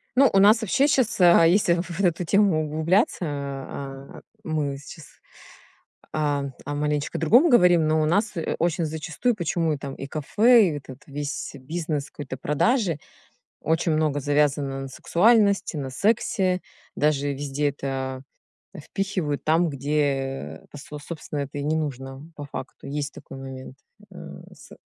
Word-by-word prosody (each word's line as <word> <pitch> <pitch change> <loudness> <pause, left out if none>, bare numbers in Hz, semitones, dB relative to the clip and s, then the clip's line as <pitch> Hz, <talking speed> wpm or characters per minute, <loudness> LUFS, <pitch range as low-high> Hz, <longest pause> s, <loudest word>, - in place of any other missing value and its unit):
Ну, 270 -1 +6
у 195 - +2
нас 215 +4 +6
вообще 265 +7 +2
щас, 255 -7 +1
а, 170 -1 +7
если 175 0 +4
в 170 - 0
в 185 - -9
вот 170 - -6
в 195 - +1
эту 175 +1 +1
тему 190 -3 +3
углубляться, 160 +8 +1
а, 140 -1 -6 0.2
мы 150 -3 -2
сейчас, 145 +2 -11 1.1
а, 145 -2 0 0.2
о 145 +1 -4
маленечко 150 0 -1
другом 245 - +5
говорим, 180 - +5
но 155 0 +2
у 155 - +2
нас 205 +7 +1 0.3
очень 170 0 0
зачастую 160 +10 -1
почему 165 -4 -1
там 135 0 -6
и 135 - -7
кафе, 210 - +4
и 150 - -3
этот 130 -1 -12
весь 145 0 -5
бизнес 150 +1 -4
какой-то 130 -3 -7
продажи 170 - +1 0.6
очень 160 +1 +1
много 155 -2 +1
завязано 145 -1 +1
на 135 - -6
сексуальности, 200 - +2
на 135 -3 -4
сексе, 190 - +1 0.3
даже 145 -1 +1
везде 145 +1 -1
это 130 -2 -4 0.5
впихивают 180 -3 -3
там, 165 +2 +2
где 135 - -2
пос 145 - -11 0.2
собственно, 150 -2 -6
это 140 +1 -5
и - - -3
не 155 +2 0
нужно 135 -2 -4
по 145 - -7
факту, 135 -1 -8
есть 145 0 -3
такой 135 - -11
момент, 130 -1 -9 0.4
э, - - -15 0.4
с - - -15
150 Hz, 150 wpm, -24 LUFS, 140-175 Hz, 1.1 s, а